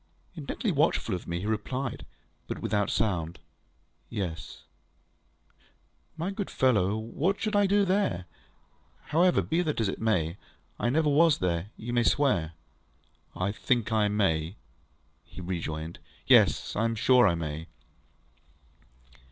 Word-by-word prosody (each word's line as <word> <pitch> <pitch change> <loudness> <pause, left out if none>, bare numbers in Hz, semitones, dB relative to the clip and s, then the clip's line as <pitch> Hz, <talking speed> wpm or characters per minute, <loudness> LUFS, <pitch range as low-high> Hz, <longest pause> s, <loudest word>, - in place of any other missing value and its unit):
Intently 160 - -3
watchful 145 - +1
of 90 - -5
me, 85 +1 -3
he - - -5
replied 115 +4 -3 0.4
(but - - -4
without 105 -1 0
sound), 85 -6 -1 0.7
ŌĆ£Yes.ŌĆØ 90 -6 -5 1.5
ŌĆ£My 175 +5 -2
good 200 -1 -4
fellow, 105 -6 +2
what 140 - -1
should 215 -1 -1
I 205 -1 +4
do 200 +1 +3
there? 185 - 0 0.8
However, 175 +4 +3
be 165 +2 0
that 155 -7 -1
as 110 - +1
it 95 - -4
may, 90 -6 +1 0.4
I 120 - +1
never 155 +4 +2
was 150 +1 +5
there, 90 +1 -1
you 120 +2 -5
may 120 - +3
swear. 105 - +2 0.8
ŌĆØ 90 +2 -1
ŌĆ£I - - -19
think 120 -3 0
I 110 -2 +3
may, 100 -6 +2
ŌĆØ 80 +4 -7 0.7
he - - -12
rejoined. 85 -2 -4 0.3
ŌĆ£Yes; - - +4
I 110 - +1
am 115 0 0
sure 125 +1 +5
I 85 - +2
may. 80 0 -5
110 Hz, 140 wpm, -28 LUFS, 90-150 Hz, 1.5 s, was